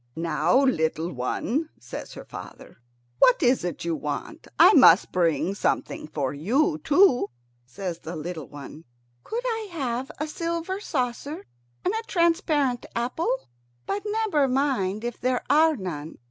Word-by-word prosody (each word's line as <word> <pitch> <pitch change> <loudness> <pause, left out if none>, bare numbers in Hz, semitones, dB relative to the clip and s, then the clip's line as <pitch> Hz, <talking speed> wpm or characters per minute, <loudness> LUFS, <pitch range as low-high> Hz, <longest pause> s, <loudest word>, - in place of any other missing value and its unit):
"Now 165 +9 +2
little 165 - +1
one," 235 - -2
says - - -8
her - - -9
father, - - -11 0.4
"what - - +5
is 250 -3 +3
it 175 -2 -4
you 170 -1 0
want? 145 -1 -5
I - - +8
must - - +7
bring 175 +1 +1
something 200 - -2
for 145 -4 -2
you 270 - +1
too." 290 - +4 0.4
Says 175 +5 -5
the 165 +2 -7
little 160 -1 -5
one, 145 +2 -10 0.4
"Could 475 +2 -4
I 450 -3 -2
have 260 -5 -3
a 305 - -1
silver 335 +4 -3
saucer 260 - -3 0.4
and 370 - +2
a 445 - -1
transparent 320 -7 +1
apple? 250 - -1 0.4
But 405 - -2
never 415 -10 +1
mind 250 -7 0
if 240 -1 -5
there 250 0 0
are 315 +2 +5
none." 165 -6 -6
250 Hz, 145 wpm, -25 LUFS, -, 0.4 s, I